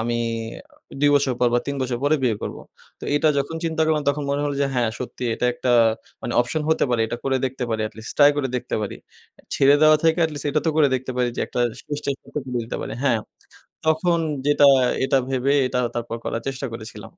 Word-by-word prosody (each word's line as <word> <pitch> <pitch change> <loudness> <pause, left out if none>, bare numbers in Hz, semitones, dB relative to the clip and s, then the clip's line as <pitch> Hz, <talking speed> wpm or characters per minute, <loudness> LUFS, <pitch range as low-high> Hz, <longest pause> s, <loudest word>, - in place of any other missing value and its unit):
আমি 115 +1 -1 0.7
অ - - -9
২ 145 0 +5
বছর 140 -2 +2
পর 125 - +4
বা - - +5
৩ 140 - -2
বছর 125 -2 -2
পরে 150 +2 +3
বিয়ে 120 -4 +2
করবো। - - -5 0.4
তো - - -7
এটা 155 +1 +3
যখন 145 +4 -2
চিন্তা 160 -1 0
করলাম, 155 -1 +1
তখন 145 +1 0
মনে 140 +1 0
হলো 145 -1 -1
যে, 140 - +3
হ্যাঁ, 120 -3 +1
সত্যি 125 0 -6
এটা 125 - 0
একটা 125 0 0 0.5
মানি 120 - -4
অপশন 135 +6 -1
হতে 160 - +3
পারে। 120 -2 +1
এটা 120 - -4
করে 135 -1 +1
দেখতে 130 -1 -2
পারি 110 -1 -1
এটলিস্ট। 110 +1 -9
ট্রাই 145 0 +8
করে 140 -2 0
দেখতে - - -4
পারি। 105 - -4 0.4
এ - - -17
ছেড়ে 140 +1 +5
দেওয়া 155 0 +7
থেকে 160 +1 +3
এটলিস্ট 150 -3 -3
এটা 155 +2 +1
তো - - +4
করে 150 -3 +5
দেখতে 130 0 -3
পারি 125 -1 +1
যে, - - -2
একটা 125 - -3 0.2
শেষ 145 - -4
চেষ্টতে 130 -4 -4
পারি - - -5
হ্যাঁ। 120 -5 +3 0.7
তখন 165 +2 +2 0.3
যেটা 145 0 +5 0.4
এটা 135 0 +3
ভেবে 135 +1 +1
এটা 125 - -1 0.2
তারপর 115 -1 -3
করার 115 - -3
চেষ্টা 135 0 -3
করেছিলাম। 110 -2 -8
135 Hz, 215 wpm, -23 LUFS, 120-145 Hz, 0.7 s, ট্রাই